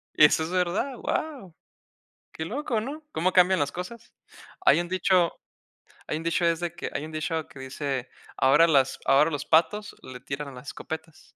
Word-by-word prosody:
Eso 150 +1 +6
es 165 - -5
verdad, 185 +9 0
guau, 255 - -4 0.8
qué 160 - -5
loco, 235 - -2
¿no? 290 +7 -6
Cómo 180 +3 0
cambian 185 0 +5
las 145 -1 0
cosas. 180 +6 -8 0.5
Hay 350 - +6
un 175 - -4
dicho 185 -1 +2 0.8
hay 155 - -1
un 165 - -6
dicho 170 +1 +1
es 165 0 +2
de 175 -1 -3
que - - -5
hay 150 - -3
un 160 - -9
dicho 160 0 -2
que 135 - -14
dice 135 -1 -4 0.3
ahora 150 +6 +5
las 135 -4 +3
ahora 150 +4 +4
los 145 -1 -3
patos 170 +6 +2
le 125 -1 -9
tiran 140 +1 -6
las 125 +3 -12
escopetas. 160 0 -8
165 Hz, 180 wpm, -26 LUFS, 145-185 Hz, 0.8 s, Eso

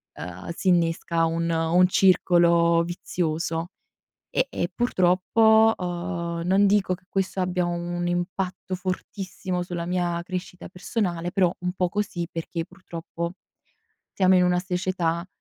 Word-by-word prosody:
uhm, 90 +1 -8
s'innesca 170 -2 +1
un 165 +1 -1
un 165 +3 +3
circolo 170 -3 +4
vizioso. 165 -1 -2 0.6
E 260 - +1
e 175 - -2
purtroppo, 220 +2 +4
uhm, 175 -1 -3
non 195 +3 +4
dico 195 -2 +2
che 180 - -24
questo 190 0 -1
abbia 180 -1 0
un 175 0 -3
impatto 180 +1 -2
fortissimo 185 0 -4
sulla 175 -1 -4
mia 175 -1 -1
crescita 180 0 -6
personale, 175 -3 -2
però 180 -2 +2
un 180 0 -2
po' 180 -1 0
così 190 -4 -2
perché 165 0 -4
purtroppo 170 -2 -6 0.8
siamo 185 -1 +4
in 180 - +5
una 180 0 +2
società 180 -2 -1
180 Hz, 125 wpm, -25 LUFS, 170-185 Hz, 0.8 s, in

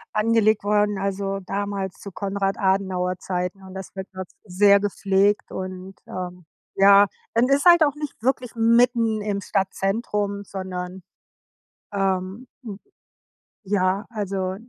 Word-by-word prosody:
angelegt 215 -1 +3
worden, 205 -1 +1
also, 195 0 -2
damals 195 0 -4
zu 200 - -9
Konrad 195 +1 -2
Adenauer 190 -2 0
Zeiten 180 +1 -4
und 190 0 -11
das 190 0 -9
wird 190 0 -6
dort, 185 -1 -6 0.2
sehr 200 +1 +4
gepflegt 200 0 +1
und 185 0 -6
ähm, 180 -1 -7 0.3
ja 200 +1 +7 0.3
und 240 +3 +3
ist 280 +3 +2
halt 345 -2 +8
auch 290 -2 +1
nicht 295 -6 -7
wirklich 250 0 -1
mitten 230 -1 +3
im 205 -1 -2
Stadtzentrum, 200 +1 -1
sondern, 185 -1 -6 0.9
ähm, 195 +4 -2 0.2
m 205 -3 -7 0.8
ja, 195 0 0
also 195 -4 -3
200 Hz, 125 wpm, -23 LUFS, 190-210 Hz, 0.9 s, halt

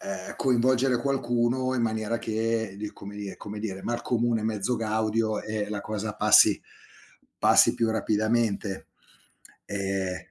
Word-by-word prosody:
ehm, 95 -1 -6
coinvolgere 130 0 +2
qualcuno 130 -1 0
in 120 - 0
maniera 110 0 -1
che 110 -2 -1
di 105 0 -5
come 100 +1 -10
dir 100 -2 -6
come 105 +1 -7
dire, 95 -3 -5
mal 120 0 -3
comune 120 -2 0
mezzo 110 +2 -1
gaudio 110 0 0
e 105 -1 -3
la 105 -1 -3
cosa 105 0 -4
passi - - +6 0.8
passi - - +5
più 115 -2 +1
rapidamente, 110 -1 0 0.8
ehm 95 -2 -3
110 Hz, 135 wpm, -27 LUFS, 105-120 Hz, 0.8 s, passi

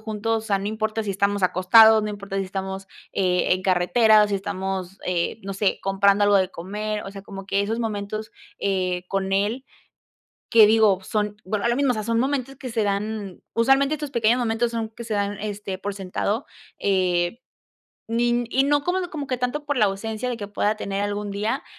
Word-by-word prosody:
juntos, 220 +1 -2
o - - -9
sea, 200 -1 +2
no 195 - -4
importa 220 +1 -2
si 210 - -3
estamos 200 +1 0
acostados, 220 +5 +6
no 210 - -2
importa 200 -1 -6
si 195 - 0
estamos, 190 0 -5 0.2
eh, 180 -2 +2
en 185 - -5
carretera 210 +4 +4
o 210 - +1
si 205 - -1
estamos, 190 -1 -4
eh, 180 +3 -1
no 195 0 -4
sé, 195 0 +1
comprando 200 +1 +3
algo 205 0 +5
de 190 -1 +2
comer, 210 +4 -4
o 195 - -7
sea, 195 0 -9
como 195 -1 -9
que 200 0 +1
esos 225 +3 -2
momentos, 215 -1 -4 0.3
eh, 185 -2 -1
con 195 0 -1
él, 210 +7 0 0.9
que 225 -2 +8
digo 215 -3 +4
son 210 +1 -2
bueno, 205 +3 -1
lo 235 - +2
mismo, 275 0 +2
o - - +2
sea, 215 -1 -3
son 230 +1 +1
momentos 270 0 -1
que 255 - -7
se 225 -2 0
dan 205 -1 -3
usualmente 270 +5 +3
estos 295 -2 -6
pequeños 235 0 +3
momentos 235 0 0
son 230 -1 -3
que 225 - -10
se 225 -2 -3
dan, 205 0 -1
este, 205 -2 -5
por 205 +1 -4
sentado, 200 +5 -2 0.3
eh, 185 +1 +1 0.7
ni 240 +1 +1
y 265 - +3
no 290 0 +2
como 365 +1 0
como 290 -3 -5
que 255 - -1
tanto 250 +4 -2
por 290 0 -1
la 215 - +4
ausencia 220 +4 -3
de 245 - -2
que 205 -3 -6
pueda 205 +1 0
tener 200 -2 -3
algún 205 0 -3
día. 210 +3 -2
210 Hz, 205 wpm, -23 LUFS, 195-230 Hz, 0.9 s, que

